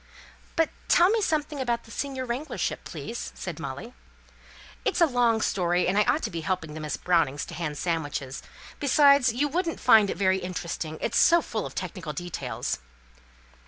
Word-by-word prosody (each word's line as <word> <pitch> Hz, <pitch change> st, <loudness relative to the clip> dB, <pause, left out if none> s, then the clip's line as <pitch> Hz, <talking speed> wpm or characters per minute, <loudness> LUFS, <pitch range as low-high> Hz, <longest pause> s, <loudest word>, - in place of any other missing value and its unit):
"But 325 Hz, -2 st, +2 dB, 0.2 s
tell 355 Hz, +3 st, +5 dB
me 450 Hz, 0 st, +2 dB
something 300 Hz, -5 st, -1 dB
about 235 Hz, -2 st, -1 dB
the 225 Hz, -, -15 dB
senior 265 Hz, -1 st, -3 dB
wranglership, 255 Hz, +6 st, -3 dB
please," 235 Hz, +1 st, -6 dB
said 175 Hz, -5 st, -6 dB
Molly. 140 Hz, -, -6 dB, 0.9 s
"It's -, -, 0 dB
a 340 Hz, -, +7 dB
long 240 Hz, -5 st, +2 dB
story, 180 Hz, -2 st, +1 dB
and 185 Hz, -, +1 dB
I 210 Hz, -, +5 dB
ought -, -, +1 dB
to -, -, -2 dB
be 165 Hz, -2 st, -4 dB
helping 160 Hz, -2 st, -2 dB
the 155 Hz, -, -6 dB
Miss 150 Hz, -1 st, -3 dB
Brownings 165 Hz, -6 st, +1 dB
to -, -, -10 dB
hand 155 Hz, -4 st, -4 dB
sandwiches 145 Hz, -6 st, -3 dB, 0.4 s
besides, 280 Hz, -3 st, +5 dB
you 265 Hz, +6 st, 0 dB
wouldn't 335 Hz, +3 st, -2 dB
find 220 Hz, -5 st, +6 dB
it -, -, -3 dB
very 190 Hz, -1 st, +2 dB
interesting, 170 Hz, -3 st, -4 dB
it's -, -, +1 dB
so 340 Hz, 0 st, +6 dB
full 225 Hz, -8 st, -3 dB
of -, -, -12 dB
technical 175 Hz, -3 st, -5 dB
details." 175 Hz, -, -4 dB
200 Hz, 175 wpm, -27 LUFS, 170-280 Hz, 0.9 s, a